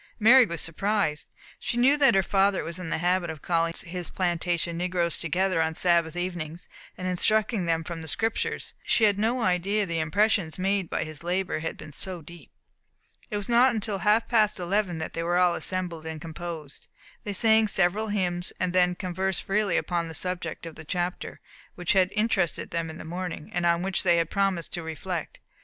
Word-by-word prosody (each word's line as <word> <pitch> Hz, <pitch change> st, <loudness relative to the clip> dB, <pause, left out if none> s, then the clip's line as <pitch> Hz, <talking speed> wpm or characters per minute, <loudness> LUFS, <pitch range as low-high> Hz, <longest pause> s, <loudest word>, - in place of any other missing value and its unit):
Mary 240 Hz, +2 st, +7 dB
was 170 Hz, -3 st, -2 dB
surprised. 165 Hz, -1 st, 0 dB, 0.3 s
She 240 Hz, -, -2 dB
knew 260 Hz, +4 st, +5 dB
that 275 Hz, -6 st, +5 dB
her 195 Hz, -, +4 dB
father 195 Hz, +1 st, +2 dB
was 170 Hz, +2 st, -5 dB
in 180 Hz, -3 st, -5 dB
the -, -, 0 dB
habit 175 Hz, +1 st, +1 dB
of 160 Hz, -3 st, -7 dB
calling 165 Hz, -1 st, +1 dB
his 175 Hz, 0 st, -4 dB
plantation 175 Hz, -1 st, -1 dB
negroes 175 Hz, -1 st, -1 dB
together 180 Hz, +1 st, +1 dB
on 160 Hz, 0 st, -1 dB
Sabbath 170 Hz, -2 st, +2 dB
evenings, 175 Hz, -2 st, -4 dB, 0.3 s
and 185 Hz, -, -4 dB
instructing 210 Hz, +2 st, +2 dB
them 165 Hz, -1 st, 0 dB
from 165 Hz, 0 st, -6 dB
the 160 Hz, -, -8 dB
Scriptures, 225 Hz, +8 st, -2 dB
but -, -, -16 dB
she 230 Hz, -, +4 dB
had 205 Hz, -2 st, +4 dB
no 235 Hz, +3 st, +1 dB
idea 185 Hz, +4 st, +1 dB
that -, -, -11 dB
the 165 Hz, -, 0 dB
impressions 185 Hz, 0 st, +1 dB
made 195 Hz, -1 st, 0 dB
by -, -, -1 dB
his 155 Hz, -1 st, -7 dB
labour 180 Hz, 0 st, -1 dB
had 160 Hz, -, -4 dB
been 155 Hz, -1 st, -11 dB
so 180 Hz, +1 st, -1 dB
deep. 170 Hz, +2 st, -13 dB, 0.8 s
It 210 Hz, -, -2 dB
was 205 Hz, -, -4 dB
not 240 Hz, +1 st, +4 dB
until 210 Hz, -2 st, -2 dB
half 210 Hz, +4 st, +3 dB
past 215 Hz, -4 st, +3 dB
eleven 180 Hz, 0 st, 0 dB
that 160 Hz, -, -5 dB
they 165 Hz, -, -3 dB
were 175 Hz, +1 st, +1 dB
all 180 Hz, -1 st, +4 dB
assembled 170 Hz, -3 st, -3 dB
and 160 Hz, -1 st, -5 dB
composed. 160 Hz, -2 st, -7 dB, 0.4 s
They 205 Hz, -, -4 dB
sang 220 Hz, +1 st, +4 dB
several 195 Hz, +3 st, +2 dB
hymns, 180 Hz, -4 st, -1 dB
then 180 Hz, -1 st, +2 dB
conversed 185 Hz, +1 st, -2 dB
freely 200 Hz, -2 st, +1 dB
upon 170 Hz, -2 st, -1 dB
the 160 Hz, -, -8 dB
subject 180 Hz, -3 st, -4 dB
of 165 Hz, -, -7 dB
the 160 Hz, -, -10 dB
chapter, 175 Hz, +3 st, -3 dB, 0.4 s
which 175 Hz, -2 st, 0 dB
had 185 Hz, -1 st, +4 dB
interested 210 Hz, -5 st, 0 dB
them 165 Hz, -1 st, -2 dB
in 160 Hz, -, -8 dB
the -, -, -9 dB
morning, 175 Hz, -1 st, -5 dB
and 175 Hz, 0 st, +1 dB
on 170 Hz, +1 st, +2 dB
which 190 Hz, -1 st, 0 dB
they 175 Hz, -2 st, +3 dB
had 165 Hz, -1 st, 0 dB
promised 195 Hz, -4 st, 0 dB
to 175 Hz, -, -3 dB
reflect. 160 Hz, +2 st, -5 dB
180 Hz, 200 wpm, -26 LUFS, 170-200 Hz, 0.8 s, Mary